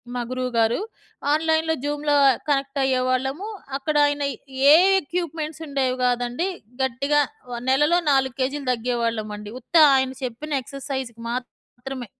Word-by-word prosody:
మా 245 Hz, -, -1 dB
గురువుగారు 245 Hz, -, 0 dB, 0.5 s
ఆన్‌లైన్‌లో 320 Hz, 0 st, +1 dB
జూమ్‌లో 295 Hz, 0 st, 0 dB, 0.3 s
కనెక్ట్ 275 Hz, 0 st, 0 dB
అయ్యేవాళ్ళము. 260 Hz, +6 st, 0 dB, 0.3 s
అక్కడాయన 290 Hz, 0 st, +1 dB, 0.5 s
ఏ -, -, +10 dB, 0.3 s
ఎక్విప్‌మెంట్స్ 320 Hz, -1 st, -4 dB
ఉండేవి 265 Hz, -3 st, 0 dB
గాదండి. 245 Hz, +8 st, 0 dB, 0.3 s
గట్టిగా 280 Hz, +4 st, +1 dB, 0.3 s
వ 240 Hz, -, -4 dB
నెలలో 300 Hz, +6 st, +4 dB
4 265 Hz, -2 st, +2 dB
కేజీలు 275 Hz, +1 st, -2 dB
తగ్గేవాళ్ళమండి. 225 Hz, -3 st, -3 dB
ఉత్త 290 Hz, -, -10 dB, 0.2 s
ఆయన 265 Hz, 0 st, +1 dB
చెప్పిన 270 Hz, +3 st, -3 dB
ఎక్సర్‌సైజ్‌కి 265 Hz, -4 st, -6 dB
మాత్రమే. 250 Hz, 0 st, -7 dB
265 Hz, 110 wpm, -23 LUFS, 245-295 Hz, 0.5 s, ఏ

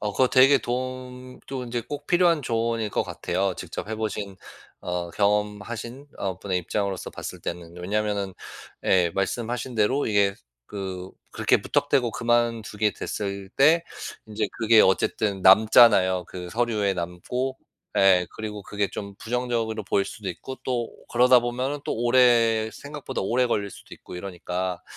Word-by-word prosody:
어 105 Hz, -1 st, -2 dB
그거 130 Hz, +3 st, +3 dB
되게 135 Hz, +2 st, +6 dB
도움 125 Hz, 0 st, -5 dB
또 130 Hz, -1 st, -4 dB
인제 120 Hz, 0 st, -3 dB
꼭 145 Hz, +4 st, -7 dB
필요한 175 Hz, -3 st, +3 dB
조언일 115 Hz, -2 st, -1 dB
것 -, -, 0 dB
같아요 95 Hz, +1 st, -2 dB
직접 90 Hz, +4 st, -6 dB
해 110 Hz, -, -2 dB
보신 105 Hz, -2 st, -4 dB, 0.4 s
어 90 Hz, -1 st, -3 dB
경험하신 105 Hz, -, -1 dB
어 95 Hz, -3 st, -3 dB
분의 95 Hz, -2 st, -1 dB
입장으로서 95 Hz, +1 st, -3 dB
봤을 -, -, -7 dB
때는. 85 Hz, 0 st, -6 dB
왜냐하면은 100 Hz, +1 st, -2 dB, 0.5 s
예 90 Hz, -2 st, +3 dB
말씀하신 120 Hz, +5 st, -2 dB
대로 115 Hz, +6 st, +2 dB
이게 100 Hz, -2 st, +2 dB, 0.3 s
그 95 Hz, -2 st, -6 dB, 0.2 s
그렇게 -, -, +2 dB
무턱대고 125 Hz, -3 st, +1 dB
그만두게 115 Hz, -3 st, 0 dB
됐을 100 Hz, -1 st, -4 dB
때 160 Hz, +5 st, +5 dB, 0.4 s
인제 105 Hz, -1 st, -2 dB
그게 110 Hz, -1 st, +6 dB
어쨌든 95 Hz, +1 st, +1 dB
남잖아요. 95 Hz, -2 st, +6 dB
그 90 Hz, -1 st, -7 dB
서류에 110 Hz, -3 st, +1 dB
남고 95 Hz, +10 st, -3 dB, 0.4 s
예 95 Hz, -2 st, +5 dB
그리고 105 Hz, -1 st, -5 dB
그게 100 Hz, 0 st, -2 dB
좀 100 Hz, -1 st, -7 dB
부정적으로 115 Hz, -2 st, -2 dB
보일 100 Hz, 0 st, +1 dB
수도 105 Hz, -3 st, -7 dB
있고 130 Hz, +9 st, -6 dB
또 120 Hz, -3 st, -2 dB, 0.2 s
그러다 125 Hz, +1 st, +6 dB
보면은 125 Hz, +4 st, -2 dB
또 -, -, -2 dB
오래 115 Hz, -2 st, +4 dB
생각보다 140 Hz, -4 st, -6 dB
오래 125 Hz, +6 st, +2 dB
걸릴 100 Hz, -4 st, -1 dB
수도 -, -, -12 dB
있고 -, -, -12 dB
이러니까 90 Hz, -1 st, -4 dB
110 Hz, 320 characters per minute, -25 LUFS, 95-120 Hz, 0.5 s, 되게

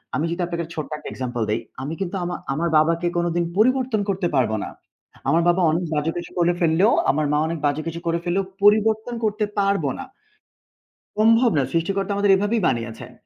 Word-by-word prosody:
আমি 150 Hz, -, 0 dB
যদি 175 Hz, +1 st, -3 dB
আপনাকে 170 Hz, -1 st, -3 dB
ছোট্ট 155 Hz, -, -4 dB
একটা -, -, -8 dB
example 120 Hz, -3 st, -3 dB
দেই, 110 Hz, +2 st, +1 dB, 0.2 s
আমি 150 Hz, +4 st, -4 dB
কিন্তু 190 Hz, +1 st, -3 dB
আমা 175 Hz, 0 st, -3 dB, 0.2 s
আমার 170 Hz, +4 st, -1 dB
বাবাকে 165 Hz, +2 st, +2 dB
কোনোদিন 175 Hz, 0 st, 0 dB
পরিবর্তন 250 Hz, -1 st, +2 dB
করতে 185 Hz, -3 st, 0 dB
পারবো 110 Hz, -4 st, +1 dB
না। -, -, -8 dB, 0.6 s
আমার 165 Hz, +1 st, +3 dB
বাবা 175 Hz, +2 st, +2 dB
অনেক 170 Hz, +2 st, -1 dB
বাজে 150 Hz, +2 st, 0 dB
কিছু 175 Hz, -, -6 dB
করে 175 Hz, 0 st, +3 dB
ফেললেও, 170 Hz, +6 st, +3 dB, 0.2 s
আমার 150 Hz, +2 st, 0 dB
মা 150 Hz, -, +2 dB
অনেক 165 Hz, 0 st, -3 dB
বাজে 145 Hz, +2 st, +1 dB
কিছু 165 Hz, +1 st, -4 dB
করে 165 Hz, 0 st, +1 dB
ফেললেও 185 Hz, +2 st, 0 dB, 0.2 s
পরিবর্তন 220 Hz, +3 st, +3 dB
করতে 210 Hz, 0 st, 0 dB
পারবো 195 Hz, -7 st, +1 dB
না। 270 Hz, -, -6 dB, 1.1 s
সম্ভব 230 Hz, +2 st, +5 dB
না। 135 Hz, -, +3 dB
সৃষ্টিকর্তা 195 Hz, +4 st, -1 dB
আমাদের 200 Hz, 0 st, +3 dB
এভাবেই 205 Hz, +3 st, 0 dB
বানিয়েছেন। 115 Hz, -2 st, -3 dB
175 Hz, 185 wpm, -22 LUFS, 155-205 Hz, 1.1 s, সম্ভব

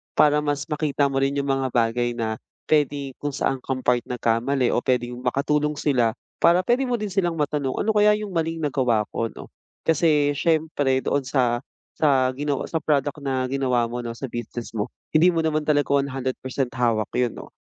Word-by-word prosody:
para 150 Hz, 0 st, +5 dB
mas 145 Hz, -1 st, -1 dB
makita 150 Hz, -1 st, 0 dB
mo 135 Hz, -, 0 dB
rin 135 Hz, +1 st, +1 dB
yung 140 Hz, -1 st, 0 dB
mga 135 Hz, -1 st, 0 dB
bagay 120 Hz, 0 st, 0 dB
na 110 Hz, -2 st, -2 dB, 0.2 s
puwede 145 Hz, -2 st, +1 dB
kung 145 Hz, -2 st, -3 dB
saan 135 Hz, -1 st, 0 dB
kang 130 Hz, 0 st, -4 dB
part 125 Hz, -1 st, +3 dB
nagkamali 125 Hz, +2 st, +1 dB
o -, -, +2 dB
puwedeng 125 Hz, -1 st, -1 dB
makatulong 150 Hz, +4 st, 0 dB
sila, 125 Hz, -6 st, +1 dB, 0.2 s
para 175 Hz, +2 st, +4 dB
puwede 245 Hz, +6 st, +1 dB
mo 245 Hz, -, +1 dB
din 210 Hz, -3 st, -4 dB
silang 175 Hz, -3 st, 0 dB
matanong, 145 Hz, -3 st, -1 dB
"Ano 220 Hz, -, +1 dB
kaya 210 Hz, 0 st, +5 dB
yung 210 Hz, -1 st, -5 dB
maling 165 Hz, -1 st, -2 dB
nagawa 125 Hz, -6 st, +1 dB
ko, 115 Hz, -, -1 dB
ano?" -, -, -12 dB, 0.3 s
Kasi 150 Hz, -2 st, +3 dB
siyempre 145 Hz, -3 st, +1 dB
doon 140 Hz, -2 st, 0 dB
sa 125 Hz, -3 st, +1 dB, 0.3 s
sa 135 Hz, -4 st, +2 dB
gina 145 Hz, +2 st, -2 dB, 0.2 s
sa 160 Hz, -, 0 dB
product 145 Hz, -1 st, 0 dB
na 135 Hz, -2 st, -1 dB
ginawa 130 Hz, -3 st, +1 dB
mo 120 Hz, -, -3 dB
'no, 115 Hz, -1 st, -5 dB
sa 130 Hz, 0 st, -6 dB
business 120 Hz, 0 st, -6 dB
mo, 105 Hz, -2 st, -2 dB, 0.2 s
hindi 155 Hz, +3 st, +5 dB
mo 165 Hz, -2 st, +2 dB
naman 155 Hz, -1 st, 0 dB
talaga 145 Hz, -2 st, +2 dB
100% 135 Hz, -2 st, -1 dB
hawak 115 Hz, -5 st, 0 dB
'yon 125 Hz, -2 st, 0 dB
'no. -, -, -10 dB
140 Hz, 185 wpm, -23 LUFS, 125-150 Hz, 0.3 s, para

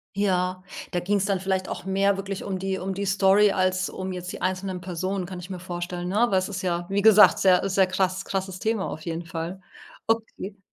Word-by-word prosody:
Ja, 185 Hz, -2 st, 0 dB, 0.3 s
da 175 Hz, -, 0 dB
ging's 195 Hz, +2 st, 0 dB
dann 195 Hz, -2 st, 0 dB
vielleicht 190 Hz, 0 st, -1 dB
auch -, -, -6 dB
mehr 195 Hz, +1 st, +2 dB
wirklich 195 Hz, 0 st, -5 dB
um 190 Hz, -1 st, -3 dB
die 190 Hz, 0 st, -2 dB
um 190 Hz, 0 st, -3 dB
die 200 Hz, 0 st, -2 dB
Story 195 Hz, +1 st, +4 dB
als 185 Hz, 0 st, +1 dB
um 185 Hz, 0 st, -5 dB
jetzt 180 Hz, 0 st, -5 dB
die -, -, -8 dB
einzelnen 185 Hz, 0 st, -2 dB
Personen 185 Hz, +1 st, -3 dB
kann 180 Hz, -1 st, -7 dB
ich 180 Hz, +2 st, -9 dB
mir 180 Hz, -, -5 dB
vorstellen, 175 Hz, 0 st, -5 dB
ne, 200 Hz, -, -1 dB
aber 235 Hz, -5 st, +3 dB
es 185 Hz, +2 st, 0 dB
ist 190 Hz, -1 st, -5 dB
ja 175 Hz, -1 st, -1 dB
wie 200 Hz, +1 st, 0 dB
gesagt 215 Hz, -1 st, +8 dB
sehr 190 Hz, +1 st, +4 dB
sehr 190 Hz, 0 st, +4 dB
krass 185 Hz, 0 st, -1 dB
krasses 190 Hz, -1 st, -3 dB
Thema 220 Hz, -3 st, -1 dB
auf 155 Hz, -, -6 dB
jeden 165 Hz, +1 st, -4 dB
Fall. 170 Hz, +3 st, -5 dB, 0.5 s
Okay. 220 Hz, -3 st, -2 dB
190 Hz, 220 wpm, -25 LUFS, 180-195 Hz, 0.5 s, gesagt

